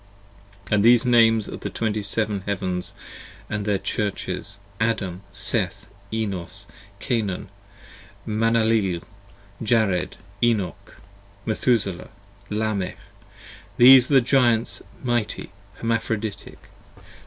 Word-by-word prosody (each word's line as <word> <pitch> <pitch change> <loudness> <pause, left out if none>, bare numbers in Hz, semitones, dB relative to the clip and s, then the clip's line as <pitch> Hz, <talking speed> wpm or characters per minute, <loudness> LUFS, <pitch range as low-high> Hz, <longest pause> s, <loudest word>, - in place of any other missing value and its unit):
10 - - -3
And 105 -1 +4
these 120 0 +6
the 125 - +1
names 115 -2 +5
of - - -7
the - - -4
Twenty 110 -2 -2
seven 105 0 0
Heavens 90 -3 -2 0.3
& - - -19
their 105 -1 0
Churches: 100 0 -3 0.2
Adam, 100 -5 -1
Seth, 100 0 0 0.3
Enos, 100 -6 -3 0.3
Cainan, 105 -7 -2 0.8
Manalaleel, 110 -4 +2 0.6
Jared, 110 -5 +1 0.3
Enoch, 110 -6 0 0.5
Methuselah, 110 -4 0 0.4
Lamech: 105 -3 -2 0.8
these 130 +1 +8
are 145 - +3
the 135 - +7
Giants 120 -3 +2 0.2
mighty, 120 -6 -1 0.2
Hermaphroditic. 110 -2 -3
110 Hz, 95 wpm, -23 LUFS, 100-115 Hz, 0.8 s, these